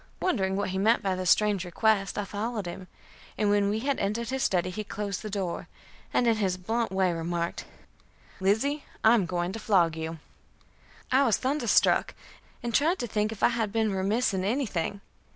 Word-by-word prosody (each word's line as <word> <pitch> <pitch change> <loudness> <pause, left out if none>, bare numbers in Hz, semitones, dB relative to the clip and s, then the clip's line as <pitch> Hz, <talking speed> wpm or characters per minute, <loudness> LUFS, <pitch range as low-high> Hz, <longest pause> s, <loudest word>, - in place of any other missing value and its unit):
Wondering 195 - 0
what 200 0 -1
he 190 - -2
meant 220 +4 +3
by 190 -2 0
his 185 -1 -1
strange 210 -2 +3
request, 195 +2 +1
I 205 - -1
followed 210 +1 -3
him, 180 +1 -7 0.5
and 210 -1 +2
when 205 -1 +3
we 210 - 0
had 280 +2 0
entered 215 +4 -1
the 265 +1 -2
study 185 -7 +1
he 215 +4 -4
closed 205 -2 -4
the 215 - -6
door, 195 -4 -3 0.4
and 245 - +2
in 230 -2 +3
his 190 -3 0
blunt 225 +4 -1
way 190 -2 +2
remarked: 170 +1 -3 0.7
"Lizzie, 225 +10 +1 0.2
I 220 - +7
am 205 -7 +2
going 175 0 -1
to 225 - -6
flog 175 -7 +3
you." 160 0 -5 0.9
I 265 +2 +5
was 225 -6 +3
thunderstruck, 275 +4 +2 0.5
and 235 -1 -3
tried 320 - +3
to 245 - -3
think 215 -1 -1
if 220 - -7
I - - +6
had 225 -3 -1
been 220 -2 +1
remiss 205 +5 +1
in 185 -1 -1
anything. 200 - -1
205 Hz, 190 wpm, -28 LUFS, 185-230 Hz, 0.9 s, I